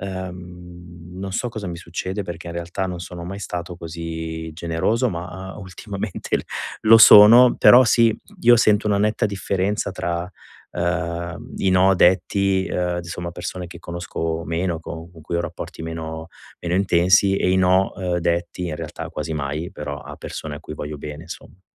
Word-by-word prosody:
Uhm, 90 -2 -9
non 95 0 -5
so 120 +5 -2
cosa 110 -3 -6
mi 85 -1 -5
succede 90 +4 -4
perché 85 -2 -8
in 85 - -6
realtà 85 +2 -3
non 90 -1 -5
sono 85 0 -8
mai 95 +3 -6
stato 90 -2 -5
così 80 -1 -6
generoso, 85 +10 0
ma, 90 +2 -7
uhm, - - -10
ultimamente 95 +1 -4
l - - -6 0.4
lo 110 +1 +8
sono. 115 +3 +9
Però 125 +1 +8
sì, 115 -1 +4 0.2
io 120 0 +6
sento 105 -1 +3
una 105 -1 +2
netta 105 +2 +1
differenza 100 0 -1
tra, 85 -2 -3 0.4
uhm, 85 0 -3
i 95 - +1
no 95 +1 +4
detti, 95 +1 +2
uhm, 90 -1 -1
d - - -12
somma, 85 0 -5
a - - -5
persone 90 +1 -6
che 85 0 -11
conosco 85 -1 -4
meno, 85 0 -2
co 80 +1 -8
con 80 - -14
cui 85 +2 -4
ho 85 - 0
rapporti 85 -1 -7
meno 80 0 -6 0.3
meno 85 0 -2
intensi, 95 +1 +4
e 90 - +1
i 95 - +3
no, 95 +1 +3
uhm, 90 -2 -2
detti 85 +1 -1
in 75 - -4
realtà - - -7
quasi 80 - -4
mai, 75 +4 -3
però 75 -4 -6
a - - -10
persone 75 -2 -7
a 75 - -9
cui - - -9
voglio 75 0 -6
bene, 75 +3 -8
insomma. 90 +2 -11
90 Hz, 180 wpm, -22 LUFS, 85-95 Hz, 0.4 s, sono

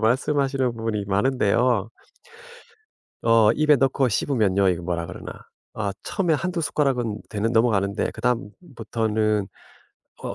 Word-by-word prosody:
말씀하시는 130 +1 +1
분이 110 -2 -2
많은데요. 115 +1 +1 1.3
어 115 -2 +5
입에 150 +1 +4
넣고 135 -1 +2
씹으면요 100 -5 +1
이거 90 -1 -1
뭐라 85 -1 -3
그러나. - - -8 0.4
아 100 -3 -2
처음에 175 -6 0
1-2 175 +3 -2
숟가락은 125 -8 -1
되는 110 +2 -2
넘어가는데 100 -4 +1
그다음부터는 110 - -2 0.7
어 - - -4
115 Hz, 285 characters per minute, -23 LUFS, 105-135 Hz, 1.3 s, 어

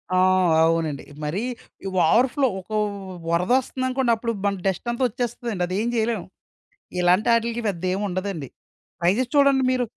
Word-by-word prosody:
ఆ! - - +3 0.5
అవునండి. 160 -4 0 0.2
మరీ 175 +10 -2 0.6
ఓవర్‌ 230 +11 +5
ఫ్లో. 275 -2 +3
ఒక 185 - -14
వ్ 195 -3 -5
వరదొస్తుందనుకోండి, 255 +6 +1
అప్పుడు 230 +1 -3
మన 200 0 +1
డస్ట్ 190 +5 -2
అంతా 240 +2 -2
వచ్చేస్తదండి. 235 -4 -3
అదేం 200 +6 -1
జేయలేం. 220 -4 0 0.8
ఇలాంటాటిలికి 230 +6 +2
పెద్దేముండదండి. 185 -3 -3 0.5
ట్రై‌జేసి 205 +9 +1
చూడండి 280 -2 +5
మీరు. 250 -1 +1
210 Hz, 120 wpm, -23 LUFS, 180-240 Hz, 0.8 s, ఓవర్‌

